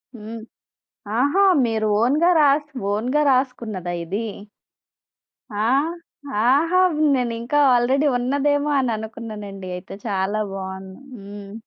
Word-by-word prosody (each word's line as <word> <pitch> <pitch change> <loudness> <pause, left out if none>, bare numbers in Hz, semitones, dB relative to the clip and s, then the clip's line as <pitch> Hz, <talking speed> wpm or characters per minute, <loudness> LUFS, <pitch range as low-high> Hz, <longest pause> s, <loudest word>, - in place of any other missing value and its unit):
హ్మ్. 225 +1 -8 0.8
ఆహా! 285 +10 +3 0.2
మీరు 220 -1 -1
ఓన్‌గా 295 +9 +3
రాస్ 290 0 +3 0.3
ఓన్‌గా 250 +8 0
రాసుకున్నదా 235 -9 -1
ఇది? 200 +7 -3 1.3
ఆ! 210 0 -2 0.8
ఆహా! 310 +9 +3 0.4
నేనింక 235 +1 -3 0.2
ఆల్రెడీ 260 +4 +2
ఉన్నదేమో 285 +3 0
అననుకున్నానండి 215 -5 -5
అయితే 180 - -10
చాలా 200 +1 -1
బావుంది. 190 +1 -7 0.2
హ్మ్. 200 0 -10
230 Hz, 95 wpm, -22 LUFS, 205-275 Hz, 1.3 s, ఆహా